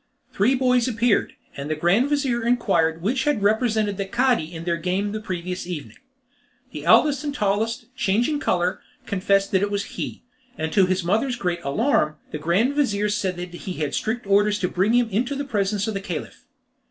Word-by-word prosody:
Three 235 +7 +3
boys 250 -2 +2
appeared, 230 -2 +1 0.2
and 140 +1 -6
the 155 - 0
grand 195 - +2
vizir 275 -5 0
inquired 170 -9 +1
which 260 +6 0
had 295 -9 +1
represented 215 -1 +1
the 195 - -2
Cadi 240 -8 +1
in 165 -1 -7
their 170 0 0
game 185 +4 -1
of 205 - -3
the 215 - -4
previous 180 -2 -4
evening. 145 -11 -7 0.7
The - - -7
eldest 290 -2 +4
and 290 -1 -3
tallest, 215 +1 0
changing 240 +10 +1
colour, 180 -7 0 0.3
confessed 195 0 +1
that 190 - +3
it 205 - +1
was 205 0 -1
he, - - -5 0.3
and 160 0 -3
to 195 -3 +4
his 185 0 0
mother's 225 +9 +1
great 175 -7 -2
alarm, 155 - +1 0.2
the 150 - -4
grand 185 - +2
vizir 210 -8 +1
said 195 -3 -1
that 175 0 -6
he 180 +1 -6
had 150 -4 -3
strict 230 +1 -2
orders 205 +1 +3
to 180 - +1
bring 190 +6 +1
him 245 -1 +3
into 245 +8 0
the 280 +1 -3
presence 205 -4 -1
of 220 - -2
the 195 - -3
Caliph. - - -6
205 Hz, 195 wpm, -23 LUFS, 180-240 Hz, 0.7 s, eldest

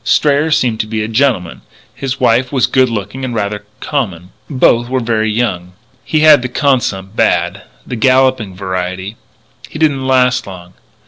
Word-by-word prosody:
Strayer 145 +1 +2
seemed 125 -8 +1
to 110 - -2
be 110 0 -2
a - - -3
gentleman; 115 -7 0 0.3
his 135 0 -4
wife 125 +2 +2
was 130 -4 +2
good 130 -1 +2
looking 110 +4 -5
and 125 -2 -3
rather 105 -1 -3
common. 95 - -3 0.2
Both 120 -4 +2
were 130 0 0
very 110 -2 0
young. 100 -6 -2 0.3
He 155 - 0
had 155 -3 +7
the 130 - -4
consump 120 -8 -1
bad 90 -3 +1 0.2
the 125 - -5
galloping 130 -4 +2
variety. 95 +2 -4 0.5
He - - -8
didn't 145 -4 0
last 125 -3 +2
long. 90 -2 -11
115 Hz, 165 wpm, -14 LUFS, 100-130 Hz, 0.5 s, had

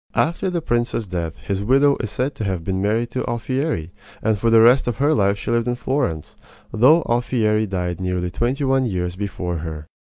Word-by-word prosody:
After 170 +4 +1
the 170 -3 -2
prince's 120 -4 -1
death 85 -4 -4
his 100 0 -3
widow 140 +5 +4
is 115 - -4
said 130 +6 -2
to - - -5
have 95 -4 -2
been 95 +2 -2
married 115 +4 0
to 130 - -2
Alfieri, 120 - -2 0.3
and 110 -1 +1
for 115 - +2
the 115 0 +6
rest 120 +4 +5
of 120 - -1
her 145 +3 +2
life 100 -1 +2
she 105 - -4
lived 120 0 +1
in 120 - 0
Florence, 120 - -2 0.4
though 145 +9 +5
Alfieri 110 -3 +1
died 90 -2 -3
nearly 90 -1 -2
twenty 125 +8 -1
one 135 -1 +2
years 90 -3 -2
before 90 -3 -4
her. 80 -1 -6
110 Hz, 200 wpm, -21 LUFS, 95-130 Hz, 0.4 s, the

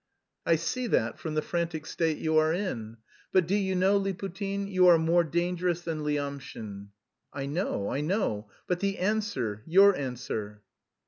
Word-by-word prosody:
"I 165 - +5
see 240 +10 -2
that 115 - 0
from 155 -2 -4
the 155 - +1
frantic 170 -2 -2
state 160 -2 0
you 160 0 0
are 155 0 +3
in. 120 - -3 0.3
But 185 -2 +4
do 190 - 0
you 195 -2 +1
know, 190 +2 +4
Liputin, 195 +1 -3
you 185 -2 +4
are 175 -1 +8
more 165 +2 +3
dangerous 175 +1 0
than 160 -3 -3
Lyamshin?" 140 -9 -4 0.4
"I 140 -1 -4
know, 145 - -2
I 140 - -1
know; 150 - -1 0.2
but 180 -1 -1
the 200 0 -1
answer, 185 - -1
your 195 +4 +7
answer!" 115 -6 -5
165 Hz, 165 wpm, -28 LUFS, 140-190 Hz, 0.4 s, are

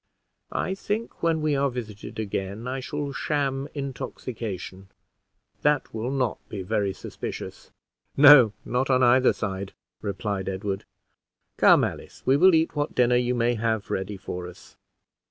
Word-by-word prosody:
I 190 - 0
think 210 +4 -4
when 165 -1 +1
we 150 -2 +2
are 140 0 +2
visited 110 -5 -7
again 100 +1 -4
I 130 +1 -2
shall 145 +2 -4
sham 140 -2 -1
intoxication 115 -8 -6 0.7
that 150 -2 +1
will 115 +3 -3
not 130 -4 -1
be 100 -3 -5
very 100 0 0
suspicious." - - -7 0.5
"No, 140 -6 +9
not 125 +2 0
on 130 -1 +4
either 125 +1 +5
side," 95 -2 -4 0.3
replied 100 -1 -3
Edward. 95 +1 -3 0.7
"Come, - - +6
Alice, - - -5
we 130 - +4
will 185 +4 +6
eat 160 0 +1
what 145 0 -2
dinner 125 0 +4
you 125 0 +1
may 120 0 +2
have 110 -2 -1
ready 95 +1 -3
for 90 -2 -6
us." 90 - -14
125 Hz, 145 wpm, -25 LUFS, 100-140 Hz, 0.7 s, No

